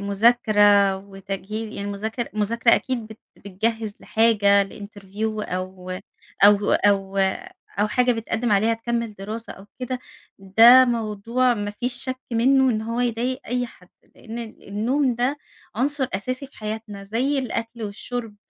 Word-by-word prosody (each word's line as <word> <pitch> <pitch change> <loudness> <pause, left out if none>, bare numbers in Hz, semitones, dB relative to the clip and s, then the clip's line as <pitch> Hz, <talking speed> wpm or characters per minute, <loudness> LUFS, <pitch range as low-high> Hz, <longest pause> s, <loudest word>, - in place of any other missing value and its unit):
مذاكرة 205 -1 +4
وتجهي 195 +2 -6
ي - - -5
المذاكرة 215 +4 -4
المذاكرة 230 +3 +3
أكيد 250 -4 -2
بت 220 0 -12 0.2
بتجهز 215 +2 -3
لحاجة 205 -3 +3
لinterview 205 0 -10 0.3
أو 185 0 -5 0.5
أو 205 0 +5
أو 195 -1 +2 0.6
أو 210 - +2
حاجة 250 +3 +2
بتقدم 225 0 -1
عليها 220 +3 +3
تكمل 235 -1 -3
دراسة 215 +4 -7
أو 195 - -14 0.2
كده؛ 250 0 -2 0.4
ده 225 +7 +7
موضوع 235 +1 0
ما 205 -2 -3
فيش 240 +4 -3
شك 260 0 -4
منّه 260 +3 +4
إن 220 -2 -1
هو 230 +2 -3
يضايق 245 +2 -1
أي 245 +1 -1
حد. 180 -6 -18 0.3
لأن 230 +1 -9
النوم 235 +4 -1
ده 250 +5 -1 0.4
عنصر 270 +4 +1
أساسي 255 +6 -3
في 270 - -24
حياتنا، 215 -2 -6
زي 250 +8 0
الأكل 230 -2 -4
والشرب 220 +1 -5
220 Hz, 135 wpm, -23 LUFS, 200-240 Hz, 0.6 s, ده